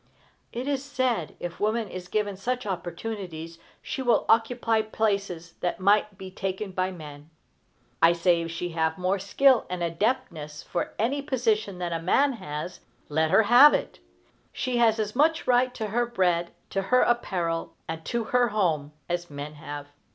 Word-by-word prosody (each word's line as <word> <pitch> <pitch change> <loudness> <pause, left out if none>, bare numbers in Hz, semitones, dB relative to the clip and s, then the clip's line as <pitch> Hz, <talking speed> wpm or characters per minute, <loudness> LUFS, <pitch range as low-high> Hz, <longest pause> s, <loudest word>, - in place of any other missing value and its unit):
It 245 +3 -4
is 280 -2 -1
said, 255 - -1
if 175 0 -6
woman 215 +1 0
is 180 -1 -7
given 205 0 -1
such 250 +6 -3
opportunities, 175 -3 -5 0.2
she 285 - -4
will 245 -2 +2
occupy 225 0 +3
places 200 -6 -2
that 175 - -2
might 205 +1 +3
be 190 -1 -8
taken 190 +1 -4
by 185 0 0
men. 150 -3 -10 0.7
I 165 +1 +7
say, 170 0 +2
if 165 - -4
she 170 +1 -4
have 160 -1 0
more 185 +2 0
skill 255 +6 +3
and 180 -1 -3
adaptedness 170 - -2
for 175 - -3
any 265 +7 0
position 220 -8 0
than 175 -1 -3
a 165 - -2
man 275 +11 +3
has, 180 -4 -6 0.3
let 160 +1 +1
her 220 - +5
have 250 +7 +8
it! - - -4 0.5
She 250 -1 -2
has 230 -2 +4
as 215 0 -2
much 320 +4 +3
right 250 0 +3
to 220 -3 -3
her 240 +3 +1
bread, 175 -7 +1 0.2
to 195 - 0
her 250 +6 +3
apparel, 175 -8 0
and 160 0 -5
to 235 -1 -1
her 245 +2 +2
home, 165 -9 0
as 175 0 -3
men 145 +1 -6
have. 145 -1 -7
195 Hz, 170 wpm, -26 LUFS, 170-235 Hz, 0.7 s, have